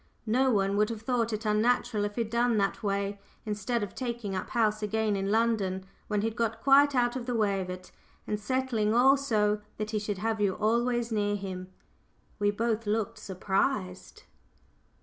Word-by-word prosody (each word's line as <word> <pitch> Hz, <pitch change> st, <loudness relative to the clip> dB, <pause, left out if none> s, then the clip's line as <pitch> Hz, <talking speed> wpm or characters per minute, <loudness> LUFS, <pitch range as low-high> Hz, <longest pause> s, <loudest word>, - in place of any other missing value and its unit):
No 255 Hz, +4 st, +2 dB
one 200 Hz, -3 st, +1 dB
would 210 Hz, +1 st, +3 dB
have 225 Hz, -1 st, -6 dB
thought 235 Hz, -2 st, 0 dB
it 215 Hz, +1 st, -4 dB
unnatural 215 Hz, 0 st, +2 dB
if 205 Hz, 0 st, -5 dB
he'd 230 Hz, -2 st, -2 dB
done 235 Hz, -1 st, +2 dB
that 195 Hz, -1 st, 0 dB
way, 200 Hz, 0 st, -1 dB, 0.3 s
instead 210 Hz, +2 st, -1 dB
of 200 Hz, -, -5 dB
taking 235 Hz, -5 st, -4 dB
up 185 Hz, -, -4 dB
house 215 Hz, -2 st, +1 dB
again 215 Hz, 0 st, 0 dB
in 195 Hz, 0 st, -1 dB
London, 205 Hz, -4 st, +1 dB, 0.2 s
when 210 Hz, -1 st, 0 dB
he'd 225 Hz, 0 st, -1 dB
got 225 Hz, -1 st, -1 dB
quite 280 Hz, +1 st, +6 dB
out 240 Hz, 0 st, +2 dB
of 250 Hz, -1 st, -5 dB
the 245 Hz, -, -1 dB
way 200 Hz, -3 st, +1 dB
of 185 Hz, -, -5 dB
it, 185 Hz, 0 st, -8 dB, 0.3 s
and 210 Hz, -, -2 dB
settling 225 Hz, -2 st, 0 dB
all 265 Hz, +3 st, +6 dB
so 210 Hz, -6 st, +1 dB, 0.2 s
that 215 Hz, 0 st, -3 dB
he 215 Hz, -, 0 dB
should 205 Hz, -1 st, -3 dB
have 220 Hz, +2 st, -1 dB
you 200 Hz, -2 st, +2 dB
always 235 Hz, +2 st, +1 dB
near 205 Hz, -1 st, +1 dB
him." 190 Hz, -2 st, -5 dB, 0.7 s
We 205 Hz, 0 st, +3 dB
both 225 Hz, +1 st, -1 dB
looked 215 Hz, 0 st, -1 dB
surprised. 190 Hz, 0 st, -2 dB
215 Hz, 185 wpm, -29 LUFS, 205-235 Hz, 0.7 s, quite